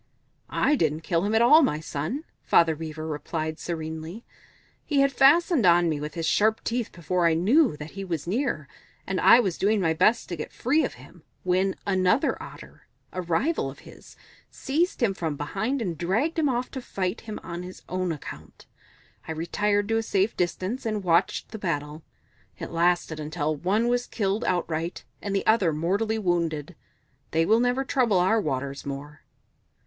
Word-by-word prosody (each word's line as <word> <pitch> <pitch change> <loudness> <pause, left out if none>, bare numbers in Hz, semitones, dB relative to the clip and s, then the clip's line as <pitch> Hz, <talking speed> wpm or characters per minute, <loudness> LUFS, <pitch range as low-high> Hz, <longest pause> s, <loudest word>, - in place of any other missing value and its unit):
"I 295 - +2
didn't 155 - 0
kill 165 0 0
him 215 +2 0
at 225 - +5
all, 300 +7 +8
my 155 - +1
son," 155 - -4 0.2
Father 165 -2 +4
Beaver 155 0 -6
replied 155 +1 -4
serenely. 160 +4 -5 0.6
"He 285 -3 +2
had 275 0 +3
fastened 300 - +4
on 175 -1 +5
me 155 -2 -1
with 150 +3 -6
his 165 -1 -2
sharp 220 +5 +2
teeth 235 -1 -2
before 170 +1 0
I 165 - +3
knew 220 - +3
that 150 +1 -8
he 195 - -6
was 170 -6 -3
near, 185 - -1 0.4
and 190 -1 -2
I 235 - +8
was 190 -8 -1
doing 210 +2 +2
my 165 -4 +2
best 215 +8 +2
to 175 - -3
get 155 - -6
free 290 +6 +1
of - - -3
him - - -16 0.2
when 185 +1 +1
another 190 +4 +2
Otter, - - -12 0.3
a 185 - -2
rival 180 - 0
of - - -11
his, - - -14 0.3
seized 320 +2 -1
him 205 -4 +3
from 160 -5 -3
behind 215 - -2
and 175 -5 -3
dragged 230 - 0
him 300 -3 +2
off 250 0 -2
to 265 - -5
fight 190 -3 -3
him 215 -1 -7
on 170 0 -6
his 180 +1 -10
own 185 -1 -1
account. 150 - -9 0.6
I - - -4
retired 205 +5 0
to 225 - +2
a - - +1
safe 200 -1 0
distance 185 +7 -2
and 215 -3 -2
watched 180 +4 +1
the 220 - -8
battle. 150 -4 -3 0.6
It - - -7
lasted 170 -2 +1
until 155 0 -2
one 200 +9 +1
was 245 0 0
killed 205 +1 -1
outright 170 -1 -2 0.2
and 200 -1 -3
the 195 - 0
other 210 -7 +4
mortally 200 +8 0
wounded. 170 -5 -1 0.5
They 165 +1 +2
will 220 +5 +4
never 245 +2 +1
trouble 245 -8 +2
our 190 +5 +3
waters 140 -3 -3
more." 145 +1 -7
185 Hz, 180 wpm, -26 LUFS, 160-225 Hz, 0.6 s, all